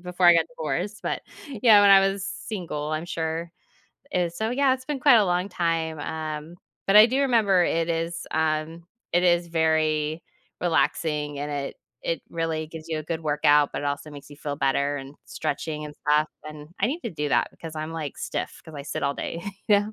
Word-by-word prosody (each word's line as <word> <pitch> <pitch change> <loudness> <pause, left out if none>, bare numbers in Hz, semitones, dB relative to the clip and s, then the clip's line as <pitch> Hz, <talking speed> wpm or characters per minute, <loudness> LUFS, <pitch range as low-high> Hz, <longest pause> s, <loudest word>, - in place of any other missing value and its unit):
before 180 0 -2
I 175 - +10
got 165 -1 +3
divorced, 170 +8 -3
but, - - -2 0.4
yeah, 215 -4 +8
when 200 - +7
I 195 - +9
was 195 0 0
single, 170 -7 -4
I'm 155 +2 -2
sure. 165 0 -3 0.6
Is 175 -5 -1
so 220 +1 -1
yeah, 265 +1 +3
it's 260 0 -9
been 295 -1 -3
quite 270 -4 +7
a 210 - +4
long 180 +2 0
time, 165 -3 -1
um, 155 +2 -5 0.3
but 195 - +6
I 215 +2 +10
do 260 +3 0
remember 220 -9 +4
it 165 -1 +1
is, 165 0 -2
um, 160 +1 -1 0.3
it 175 +1 +3
is 175 -1 +3
very 160 -1 +1 0.4
relaxing, 155 -4 0
and 145 +1 -3
it 140 -1 -4 0.3
it - - -2
really 165 -1 -2
gives 160 0 -10
you 160 -1 -1
a 155 - -6
good 165 0 -3
workout, 150 -1 +3
but - - -3
it - - -4
also 145 +1 -3
makes 145 -1 -11
you 145 - -11
feel 145 -1 -4
better 140 +1 +1
and 135 +1 -8
stretching 150 0 -3
and 150 -1 -8
stuff, 150 +1 +4 0.2
and 150 0 -9
I 205 - +4
need 310 +7 -3
to - - -2
do 150 -3 -3
that - - +3
because 160 -1 -9
I'm, 155 +1 -4
like, 155 -4 -5
stiff - - -4
'cause 160 - -12
I 140 - -6
sit 140 - -4
all 140 0 +1
day. 170 - -4 0.3
Yeah. 205 0 +4
160 Hz, 210 wpm, -25 LUFS, 150-180 Hz, 0.6 s, I